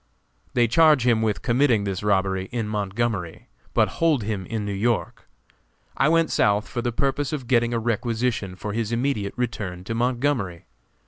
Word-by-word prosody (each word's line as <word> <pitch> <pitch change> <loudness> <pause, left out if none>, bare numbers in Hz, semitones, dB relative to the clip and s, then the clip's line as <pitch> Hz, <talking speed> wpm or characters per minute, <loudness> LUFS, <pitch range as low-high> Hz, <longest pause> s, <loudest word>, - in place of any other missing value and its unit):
They 120 -1 +4
charge 150 0 +5
him 115 -3 +3
with 110 -2 -1
committing 120 -3 +3
this 95 -2 -3
robbery 95 -2 0
in 115 -3 -2
Montgomery, 105 -3 -3 0.3
but - - +4
hold 155 -8 +3
him 100 -3 -3
in 110 -2 -3
New 100 - -3
York. 110 +3 -1 0.7
I 135 - +3
went 165 0 +3
South 105 +1 +2
for 120 - -3
the 120 0 -1
purpose 135 +3 -1
of 145 -5 -4
getting 120 -1 +2
a 120 - 0
requisition 115 -3 -1
for 105 +3 -5
his 115 0 -2
immediate 120 -4 -1
return 100 -7 -3
to 115 - -4
Montgomery. 120 -6 -1
115 Hz, 170 wpm, -24 LUFS, 100-125 Hz, 0.7 s, charge